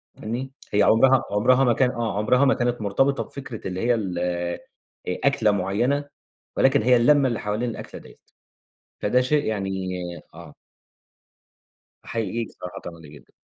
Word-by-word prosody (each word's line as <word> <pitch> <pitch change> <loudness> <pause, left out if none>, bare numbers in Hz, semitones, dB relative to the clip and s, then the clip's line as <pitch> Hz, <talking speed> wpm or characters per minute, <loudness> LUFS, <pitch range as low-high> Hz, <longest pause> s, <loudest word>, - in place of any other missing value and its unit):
فاهمني؟ 125 +5 -5 0.2
هي 105 - +3
عُمرها 130 +3 +5
عُمرها 125 +6 +3
ما 120 -3 +4
كان 125 +1 +2
آه. 115 -4 -3
عُمرها 125 +6 +3
ما 135 - +4
كانت 120 -2 -1
مرتبطة 135 +8 +1
بفكرة 130 -7 -8
اللي 95 0 -4
هي 120 +3 +2
ال 95 -5 -3 0.9
أ 90 - -2
أكلة 110 -6 +3
معيّنة 105 +9 0 0.5
ولكن 135 +1 +4
هي 125 0 +4
اللمة 140 +3 +4
اللي 120 -3 -2
حوالين 105 +4 -2
الأكلة 115 - -8
ديّة. - - -16 0.8
فده 125 +5 +2
شيء 145 +3 +1
يعني 95 -3 -2 0.4
آه. 80 -2 -12 1.5
أحييك 115 0 -3
الصراحة، 90 0 -9
طبعًا 85 -1 -9
ده 80 - -13
جدًا. 75 0 -16
115 Hz, 150 wpm, -24 LUFS, 100-130 Hz, 1.5 s, عُمرها